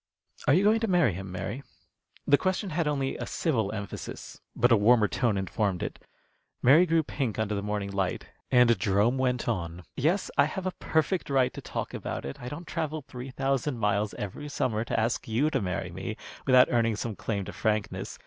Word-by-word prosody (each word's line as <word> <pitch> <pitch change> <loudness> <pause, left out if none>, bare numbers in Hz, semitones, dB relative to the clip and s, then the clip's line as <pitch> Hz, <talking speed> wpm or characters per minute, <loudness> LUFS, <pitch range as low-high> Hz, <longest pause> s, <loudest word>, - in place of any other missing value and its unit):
Are 140 - +6
you 185 - +4
going 215 +2 +4
to 225 - -1
marry 175 - +3
him, 95 +1 -6
Mary?" 105 +8 -4 0.6
The 145 - +6
question 185 +1 -1
had 155 0 0
only 140 -2 -1
a - - -5
civil 115 - 0
emphasis, 100 -2 -7
but 120 +1 +3
a - - +8
warmer 110 +1 +5
tone 115 -2 0
informed 95 0 -1
it. - - -5 0.6
Mary 155 +8 +7
grew 165 0 +3
pink 135 -6 -3
under 110 -1 -1
the 100 - -1
morning 105 -1 -3
light, 95 -2 -1 0.2
and 125 -4 +5
Jerome 105 +7 +2
went 125 -2 0
on: 85 0 -2
"Yes, 170 +9 +1
I 140 - +7
have 180 +5 -4
a 185 - 0
perfect 160 +3 0
right 130 -2 +2
to - - -7
talk - - -5
about - - -4
it, 70 - -7
I 125 - -5
don't 165 +5 -7
travel 155 -2 -3
three 130 -1 -7
thousand 135 0 -1
miles 105 -1 0
every 145 +9 -6
summer 115 -6 0
to - - 0
ask 110 +2 -1
you 125 +8 +1
to 135 - 0
marry 90 -2 -3
me - - -5 0.3
without 130 -1 +7
earning 115 -2 +2
some 110 0 -4
claim 100 -2 -3
to - - -7
frankness. 110 -1 -2
125 Hz, 200 wpm, -28 LUFS, 105-145 Hz, 0.6 s, a